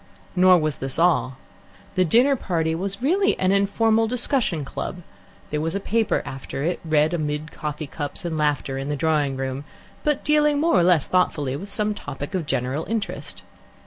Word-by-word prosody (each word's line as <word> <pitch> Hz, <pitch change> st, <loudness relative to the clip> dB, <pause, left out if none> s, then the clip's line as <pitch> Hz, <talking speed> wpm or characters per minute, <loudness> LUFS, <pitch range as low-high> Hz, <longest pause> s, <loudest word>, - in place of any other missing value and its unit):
Nor 185 Hz, 0 st, +6 dB
was 155 Hz, -3 st, -1 dB
this 135 Hz, 0 st, -4 dB
all. 135 Hz, -7 st, +2 dB, 0.6 s
The 185 Hz, -2 st, +3 dB
dinner 245 Hz, -, +4 dB
party 165 Hz, -8 st, -1 dB
was 195 Hz, +6 st, -4 dB
really 385 Hz, +8 st, +2 dB
an 185 Hz, 0 st, +2 dB
informal 220 Hz, +3 st, +3 dB
discussion 240 Hz, -, 0 dB
club; 175 Hz, +5 st, -5 dB, 0.5 s
there 150 Hz, 0 st, -1 dB
was 165 Hz, +3 st, -2 dB
a -, -, 0 dB
paper 225 Hz, +2 st, 0 dB
after 135 Hz, +1 st, -5 dB
it, 170 Hz, +2 st, -1 dB
read 155 Hz, 0 st, +2 dB
amid 155 Hz, -1 st, -2 dB
coffee 150 Hz, 0 st, -5 dB
cups 145 Hz, +4 st, -6 dB
and 165 Hz, -2 st, -2 dB
laughter 145 Hz, -3 st, 0 dB
in 135 Hz, +1 st, -4 dB
the 145 Hz, -, 0 dB
drawing 145 Hz, -2 st, +1 dB
room, 135 Hz, +1 st, -3 dB, 0.4 s
but 295 Hz, -2 st, 0 dB
dealing 300 Hz, -1 st, +3 dB
more 330 Hz, +3 st, +2 dB
or -, -, +4 dB
less 175 Hz, -5 st, +4 dB
thoughtfully 150 Hz, -7 st, +1 dB
with 195 Hz, +8 st, -7 dB
some 210 Hz, +1 st, 0 dB
topic 145 Hz, -2 st, -7 dB
of 175 Hz, -5 st, -2 dB
general 130 Hz, +5 st, -1 dB
interest. 220 Hz, -3 st, -4 dB
170 Hz, 175 wpm, -23 LUFS, 150-205 Hz, 0.6 s, Nor